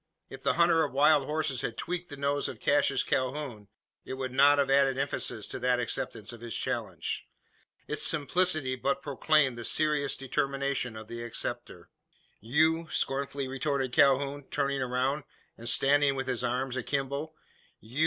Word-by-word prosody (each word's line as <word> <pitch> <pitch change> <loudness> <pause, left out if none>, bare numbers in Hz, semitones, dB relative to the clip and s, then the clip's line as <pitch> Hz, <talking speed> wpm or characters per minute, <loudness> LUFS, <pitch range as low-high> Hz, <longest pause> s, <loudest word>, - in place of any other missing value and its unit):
If - - -10
the - - +2
hunter 170 -1 +4
of 145 - -3
wild 145 0 +4
horses 150 -4 -1
had 115 - -4
tweaked 180 0 -4
the 145 - -8
nose 140 +1 0
of - - -8
Cassius 145 -2 +2
Calhoun, 130 -5 -2 0.4
it 130 - -6
would 130 -1 -4
not 140 +2 +6
have 140 -1 +2
added 135 -1 +4
emphasis 135 -5 -2
to - - -4
that 125 0 +2
acceptance 115 -2 -3
of 115 - -11
his 120 -2 -2
challenge. - - -3 0.6
Its - - -2
simplicity 155 -3 +1
but 140 +8 -1
proclaimed 140 -2 +2
the - - -5
serious 150 +1 +1
determination 135 -2 -1
of 110 0 -9
the 120 +1 -6
acceptor. 120 -5 -5 0.5
"You?" 160 +8 +2
scornfully 135 0 -2
retorted 135 -1 -2
Calhoun, 140 +1 +3
turning 140 -1 -1
round, 130 +3 0 0.3
and 120 +1 -3
standing 140 +3 +4
with 135 0 -2
his 125 -2 -2
arms 125 +1 -1
akimbo. 140 +4 -3 0.4
"You?" 120 +6 -8
135 Hz, 160 wpm, -29 LUFS, 125-145 Hz, 0.6 s, not